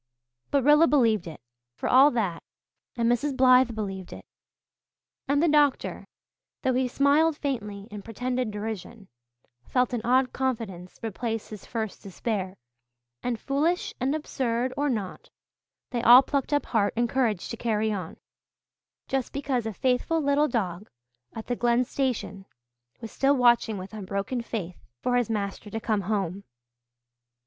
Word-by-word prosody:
But 280 -2 +2
Rilla 295 +4 +6
believed 225 - +3
it, 160 - -9 0.3
for - - -3
all 270 +3 +7
that; 210 - -2 0.6
and 230 -1 +1
Mrs. 260 +3 +1
Blythe 255 -2 +5
believed 195 -4 -5
it; - - -10 1.0
and 285 +2 +2
the - - +4
doctor, 295 -3 +2 0.6
though 260 -1 +2
he 255 +1 +1
smiled 290 +4 +3
faintly 210 -9 -4
in 205 -1 -7
pretended 250 +3 -2
derision, 210 0 -6 0.6
felt 250 -1 +1
an 240 - -1
odd 255 +1 +2
confidence 220 -9 -3
replace 225 0 -3
his 210 -2 -10
first 220 -4 -4
despair; 195 -1 -4 0.6
and 240 -3 -2
foolish 305 - 0
and 265 +4 0
absurd 255 -4 -2
or 290 +1 0
not, 210 -7 -4 0.6
they 240 -2 -1
all 245 +3 +9
plucked 275 +1 -2
up 290 0 +1
heart 210 -4 0
and 240 0 +2
courage 230 -7 0
to - - -4
carry 220 -2 0
on, 185 -5 -6 0.9
just 270 -2 -2
because 265 -5 -2
a - - -2
faithful 255 +8 0
little 290 0 +2
dog 195 - -3 0.5
at 220 - -6
the 245 - -2
Glen 240 +1 +2
station 240 -7 -3 0.5
was 225 - -7
still 280 +1 +2
watching 240 -3 +3
with 190 +3 -8
unbroken 200 +4 -3
faith 195 -7 -6 0.2
for 250 - +1
his 245 -3 +1
master 205 -1 -3
to 225 - -4
come 215 -2 0
home. 195 -1 -2
235 Hz, 150 wpm, -26 LUFS, 210-265 Hz, 1.0 s, all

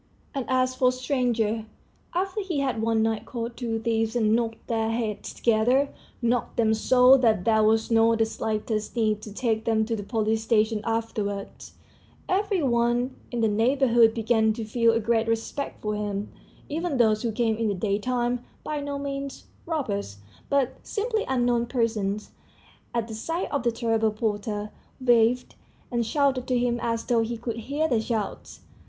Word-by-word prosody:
And 270 -4 -2
as 255 0 +2
for 255 0 +3
strangers, 245 -4 0 0.5
after 385 +3 -1
he 360 -7 -2
had 260 -5 -1
one 225 0 +2
night 225 -1 0
caught 235 -1 -4
two 230 -3 -2
thieves 225 0 0
and 220 -2 +3
knocked 230 -1 -2
their 225 -1 0
heads 225 -2 -3
together 245 +5 +2 0.3
knocked 235 0 0
them 220 -2 +3
so 250 +4 +6
that 220 -7 +2
there 220 -1 +4
was 220 +2 +2
not 225 0 +4
the 225 - +3
slightest 215 0 -3
need 215 -3 +1
to 215 - -9
take 220 0 -1
them 220 -1 +2
to 225 +1 -1
the 210 - -4
police 220 +1 0
station 220 -1 +2
afterwards 215 -3 -3 0.5
every 390 -2 +1
one 240 0 +1 0.2
in 240 -2 -2
the 225 - +4
neighborhood 230 +1 +4
began 220 -1 +2
to 225 0 -5
feel 230 +1 +3
a 225 - +2
great 225 0 +1
respect 230 +5 -3
for 210 0 -1
him; 205 -1 -3 0.4
even 320 -1 -2
those 215 -3 +3
who 235 - -1
came 225 0 +1
in 225 -1 0
the 205 - 0
daytime, 240 +5 -1 0.2
by 305 -1 -3
no 285 0 -3
means 275 -1 -5 0.2
robbers, 205 - -2 0.3
but 275 -2 +1
simply 440 +1 -2
unknown 245 -2 +1
persons, 220 -4 -1 0.6
at 235 -2 -1
the 225 - -7
sight 330 +11 -3
of 285 - 0
the 235 0 +1
terrible 225 -1 +1
porter, 210 -1 -3 0.3
waved 245 -1 +3 0.4
and 235 -2 0
shouted 270 -1 +1
to 255 - +2
him 240 0 +1
as 230 -1 -1
though 235 -2 +2
he 230 +1 -2
could 230 0 -4
hear 285 +7 -1
their 235 -7 +1
shouts. 220 -2 -4
230 Hz, 170 wpm, -26 LUFS, 220-255 Hz, 0.6 s, so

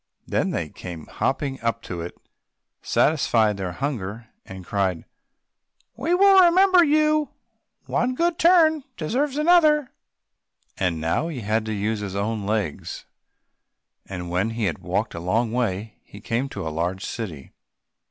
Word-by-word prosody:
Then - - 0
they - - -3
came 85 -3 -9
hopping 135 -1 -2
up 115 0 -1
to 85 -2 -5
it, 85 - -7 0.6
satisfied 115 -9 +2
their 95 -2 -4
hunger, 115 -3 -4 0.2
and 95 -1 -9
cried, 95 -4 -1 0.9
"We 345 +2 0
will 390 0 +7
remember 365 +1 +6
you—one 305 -4 -1
good 340 +3 0
turn 320 -4 +5
deserves 260 - -1
another!" 305 -3 +4 0.8
And 90 -4 -1
now 80 - 0
he 150 -7 -5
had 110 +1 0
to - - -2
use 105 +1 -1
his 100 -2 -5
own 105 0 -2
legs, 105 -8 -3 1.0
and 90 -2 -6
when 95 +5 0
he 115 - -1
had 95 -6 -1
walked - - -2
a 85 - -5
long 110 +7 0
way, 110 -3 -2
he 100 - -13
came 115 +6 -2
to 80 - -5
a 80 - -4
large 90 +4 -2
city. 85 - -6
115 Hz, 140 wpm, -23 LUFS, -, 1.0 s, will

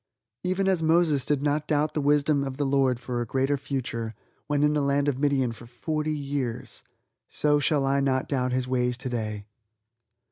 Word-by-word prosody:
Even 185 +1 0
as 185 -3 +2
Moses 160 -4 +3
did 145 -2 +1
not 150 +1 0
doubt 150 0 +1
the 150 - -1
wisdom 145 0 +3
of 135 -1 -5
the 145 - 0
Lord 135 -3 +2
for 120 -1 -3
a - - -2
greater 135 +4 +1
future 120 -5 -4 0.3
(when 145 -1 +1
in 150 0 +3
the 150 - +1
land 140 +1 +1
of 135 -2 0
Midian 140 -4 +2
for 115 +1 -11
forty 155 +6 -2
years), 140 -4 -4 0.5
so 150 -1 +2
shall 145 -1 +2
I 135 +1 +2
not 135 -1 +1
doubt 130 -2 0
His 125 0 0
ways 125 -1 0
today. 110 -5 -4
140 Hz, 185 wpm, -26 LUFS, 125-150 Hz, 0.5 s, Moses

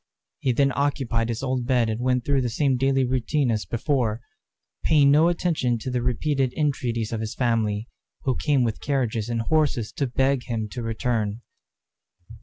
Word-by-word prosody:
He 130 - +1
then 135 +3 +2
occupied 130 -5 0
his 115 +2 -3
old 130 -2 -1
bed 125 -3 +3
and 110 +2 -2
went 125 -1 +1
through 140 -2 +2
the 125 - -1
same 135 +3 +1
daily 135 +1 +2
routine 130 +2 0
as 110 -2 -1
before, 120 -3 0 0.6
paying 145 -3 +5
no 155 +3 +5
attention 165 -8 0
to 130 +3 -5
the 125 -1 0
repeated 130 +2 0
entreaties 125 -7 -1
of 110 - -2
his 110 -1 -4
family, 110 -3 0 0.4
who 130 -2 +1
came 145 -4 +2
with 115 -2 -2
carriages 120 -5 -1
and 115 -1 -1
horses 145 -6 +1
to 140 - -2
beg 130 +1 +1
him 115 -3 -2
to 120 - -6
return. 115 -1 -2
125 Hz, 175 wpm, -24 LUFS, 115-140 Hz, 0.6 s, paying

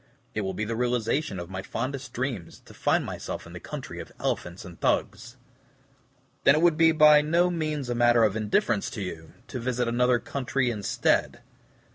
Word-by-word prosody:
It 110 - -1
will 95 -2 -3
be 110 - -2
the 115 +1 -3
realization 120 0 0
of 85 +1 -7
my 95 0 -4
fondest 130 +6 -4
dreams, 120 -8 -4
to - - -14
find - - +1
myself - - -6
in - - -12
the - - -7
country - - -7
of - - -8
elephants 85 +2 -3
and 90 -2 -12
Thugs." 120 +2 -1 1.1
"Then 140 - +6
it 155 - +2
would 175 -2 +5
be 165 +1 +5
by 150 -1 +7
no 170 +4 +2
means 155 -5 -2
a 120 - -1
matter 120 -1 +4
of 105 -2 +2
indifference 110 0 +1
to 105 - -6
you, 80 -3 -8
to 130 - -5
visit 125 0 -1
another 125 +1 +3
country 130 0 -1
instead." 105 -4 0
120 Hz, 185 wpm, -27 LUFS, 105-140 Hz, 1.1 s, by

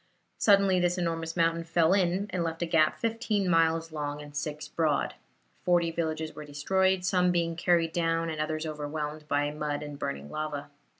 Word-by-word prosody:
Suddenly 195 -3 +5
this 175 0 +1
enormous 165 -1 -2
mountain 165 0 +2
fell 165 +1 +3
in, 190 0 +2
and 180 -2 -1
left 165 +1 -2
a - - +1
gap 160 -2 +3
fifteen 225 -3 0
miles 165 -1 +2
long 145 -1 -4
and 145 0 -11
six 150 +1 -4
broad. 155 -3 0 0.5
Forty 175 -2 +3
villages 160 -1 -2
were 150 - -8
destroyed, 185 +6 +1
some 180 -1 +3
being 170 -1 0
carried 170 -1 +2
down 165 -1 +1
and 155 -1 -3
others 155 +1 -2
overwhelmed 150 0 -4
by 145 0 +1
mud 150 -1 -3
and 145 -1 -8
burning 70 - -4
lava. 150 -2 -4
165 Hz, 175 wpm, -29 LUFS, 150-175 Hz, 0.5 s, Suddenly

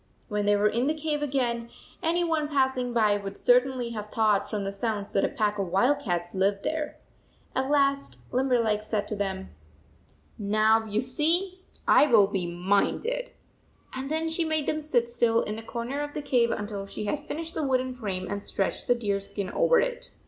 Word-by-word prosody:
When 210 -1 -1
they 205 - +5
were 205 +1 +3
in 235 +5 0
the 310 - +1
cave 305 -1 -2
again, 245 -5 -1 0.3
any 345 0 +1
one 320 -3 0
passing 265 -3 +1
by 215 -3 +3
would 200 -1 -7
certainly 250 -1 +2
have 210 -2 -6
thought 215 -3 +2
from 210 -2 -2
the 195 0 -3
sounds 205 0 -3
that 195 - +2
a - - +2
pack 210 -5 -1
of 195 - -1
wildcats 190 -4 +1
lived 195 +1 +1
there. 310 -1 -2 0.6
At 265 +1 0
last 280 -1 +1
Limberleg 245 -5 +2
said 215 -1 -2
to 210 - -2
them, 190 - -3 0.5
* - - -33 0.2
Now, 220 +1 +4
you 215 0 0
see, 340 +9 +1 0.3
I 295 - +6
will 225 -7 +6
be 195 -3 -2
minded," 205 - 0 0.6
and 265 +1 -5
then 320 +1 0
she 325 +1 0
made 315 -2 0
them 310 - -1
sit 250 -6 +1
still, 235 -1 +2
in 210 - -4
the 225 - -6
corner 235 +5 -4
of 290 0 -5
the 300 - -3
cave 245 -4 +2
until 205 -2 -4
she 210 - -5
had 290 +8 -3
finished 325 +1 -5
the - - -2
wooden 260 -2 0
frame 195 -7 -3
and 200 0 -3
stretched 195 -1 -2
the 245 - +4
deer 205 -4 -1
skin 200 0 -5
over - - +4
it. - - -2
235 Hz, 195 wpm, -27 LUFS, 205-290 Hz, 0.6 s, I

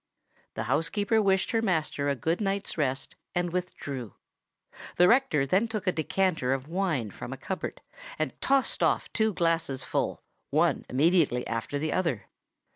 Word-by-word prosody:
The 110 - -2
housekeeper 200 - +1
wished 195 -2 +2
her 225 - +2
master 155 -8 0
a 140 - +1
good 165 - -1
night's 200 0 -1
rest, 135 -3 -1 0.2
and 175 -1 0
withdrew. 140 - -4 0.8
The 180 - +6
rector 240 - +4
then 190 - +2
took 215 -3 -4
a 185 - +3
decanter 160 -5 0
of 135 +1 -4
wine 165 - -1
from - - -8
a - - -5
cupboard, - - -5 0.4
and 155 -4 -1
tossed 275 -1 +2
off - - +1
two 220 0 +2
glasses 165 -7 0
full, - - -2 0.3
one - - +2
immediately 145 -3 +3
after 115 +5 -3
the 155 +2 -1
other. 165 - 0
165 Hz, 155 wpm, -28 LUFS, 135-195 Hz, 0.8 s, The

